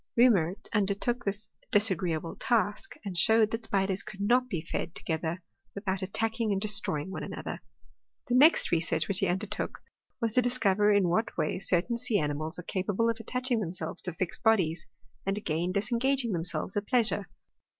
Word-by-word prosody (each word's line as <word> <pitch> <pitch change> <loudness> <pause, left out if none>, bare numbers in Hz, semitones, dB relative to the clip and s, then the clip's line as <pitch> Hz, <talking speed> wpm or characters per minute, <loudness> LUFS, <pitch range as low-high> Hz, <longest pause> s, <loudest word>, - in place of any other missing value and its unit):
Reaumur 195 -8 +5 0.2
undertook 210 +4 0
this 200 +1 -3 0.2
di^igreeable 180 -6 +2
task, 225 - 0
and 195 -3 -4
showed 220 +3 +4
that 225 0 -2
spiders 195 -2 0
could 195 - -10
not 250 +5 +2
be 170 -7 -3
fed 170 - -4
together 160 +2 -3 0.3
without 195 -1 -2
attacking 225 +3 -1
and 195 - +1
destroying 195 -6 -2
one - - -5
another. - - -6 0.7
The 245 - -1
next 290 +6 +6
research 165 -1 +1
which 200 -2 +1
he 195 - +1
undertook, 180 +2 -3 0.4
was 230 -3 -1
to 250 - +4
dis 245 +1 0
cover 205 -1 +3
in 200 -3 +4
what 215 +7 0
way - - 0
certain 195 +6 +1
sea 240 -3 +1
animals 155 0 -2
are 180 - -7
capable 205 +6 0
of 230 - -6
attaching 250 +1 -1
themselves 170 -3 -4
to 180 - -4
fixed 175 +1 -3
bodies, 185 -8 +2 0.4
and 195 +1 -1
again 170 -2 -1
disengaging 235 +5 +1
themselves 175 +1 -3
at 205 0 -2
pleasure. 220 -5 +1
200 Hz, 170 wpm, -29 LUFS, 180-225 Hz, 0.7 s, next